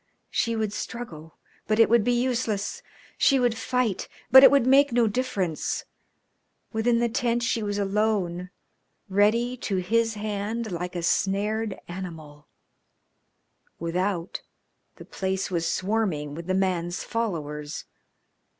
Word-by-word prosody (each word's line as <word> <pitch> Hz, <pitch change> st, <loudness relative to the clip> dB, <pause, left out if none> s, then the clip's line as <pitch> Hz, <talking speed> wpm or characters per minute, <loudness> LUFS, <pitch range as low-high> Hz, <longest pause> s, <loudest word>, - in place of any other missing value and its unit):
She 230 Hz, 0 st, 0 dB
would 215 Hz, -2 st, -1 dB
struggle, 165 Hz, -12 st, -7 dB, 0.3 s
but 215 Hz, +1 st, +1 dB
it 225 Hz, -, +7 dB
would 235 Hz, -1 st, +4 dB
be 245 Hz, +1 st, +2 dB
useless; 235 Hz, -5 st, -1 dB, 0.4 s
she 275 Hz, -, +5 dB
would 245 Hz, -2 st, +2 dB
fight, 240 Hz, -4 st, -1 dB, 0.2 s
but 265 Hz, +1 st, +10 dB
it -, -, +11 dB
would 280 Hz, -4 st, +3 dB
make 275 Hz, +2 st, +5 dB
no 235 Hz, 0 st, +3 dB
difference. 205 Hz, -8 st, -2 dB, 0.9 s
Within 230 Hz, +2 st, +2 dB
the 235 Hz, 0 st, +2 dB
tent 240 Hz, +1 st, 0 dB
she 230 Hz, -1 st, 0 dB
was 205 Hz, -1 st, -2 dB
alone, 195 Hz, -3 st, 0 dB, 0.6 s
ready 220 Hz, +5 st, +2 dB
to 205 Hz, -4 st, -3 dB
his 225 Hz, +5 st, +1 dB
hand 215 Hz, +1 st, -3 dB
like 180 Hz, +1 st, -4 dB
a 175 Hz, -, -3 dB
snared 205 Hz, +4 st, 0 dB
animal; 160 Hz, -5 st, -8 dB, 1.3 s
without, 175 Hz, +1 st, -2 dB, 0.5 s
the -, -, -12 dB
place 190 Hz, 0 st, -3 dB
was 170 Hz, -2 st, 0 dB
swarming 185 Hz, -8 st, -1 dB
with 170 Hz, +3 st, -8 dB
the 185 Hz, -, +1 dB
man's 180 Hz, -2 st, -1 dB
followers. 150 Hz, -10 st, -4 dB
205 Hz, 130 wpm, -26 LUFS, 180-230 Hz, 1.3 s, it